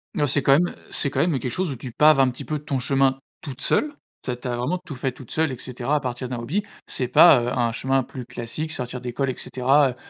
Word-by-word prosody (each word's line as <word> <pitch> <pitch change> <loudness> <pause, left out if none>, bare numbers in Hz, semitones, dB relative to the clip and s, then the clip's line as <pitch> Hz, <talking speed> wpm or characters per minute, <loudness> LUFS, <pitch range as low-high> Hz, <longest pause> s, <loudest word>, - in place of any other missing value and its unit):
Non, 145 -2 +1
c'est 145 +1 +3
quand 135 - +5
même 175 +5 +2 0.2
c'est 140 - +1
quand - - -3
même 160 -4 +2
quelque 125 +1 -4
chose 185 +4 -1
où - - -4
tu 125 0 -8
paves 150 +3 +5
un 130 - +4
petit 125 - -8
peu 155 -1 -2
ton 140 -2 -3
chemin 135 +1 +2 0.2
toute 140 -4 -8
seule. 300 0 +1 0.3
Tu 125 - -2
as - - -2
tu 125 - -7
as 120 - -1
vraiment 145 +10 -2
tout 140 - -7
fait 130 +1 -2
toute 125 -1 -14
seule 160 -2 0
et 130 - -5
cetera, 125 +3 -2
à 150 - +2
partir 125 -1 -4
d'un 125 - -3
hobby. 160 - -2 0.2
C'est 125 -2 -1
pas, 135 -1 +7
heu, - - -2
un 120 -2 +1
chemin 135 +2 +1
plus 125 0 -9
classique, 120 +8 -4
sortir 125 -2 -3
d'école 125 +2 -2
et 130 - -3
cetera, 135 +2 +2
heu, 125 - -6
130 Hz, 275 wpm, -23 LUFS, 125-145 Hz, 0.3 s, pas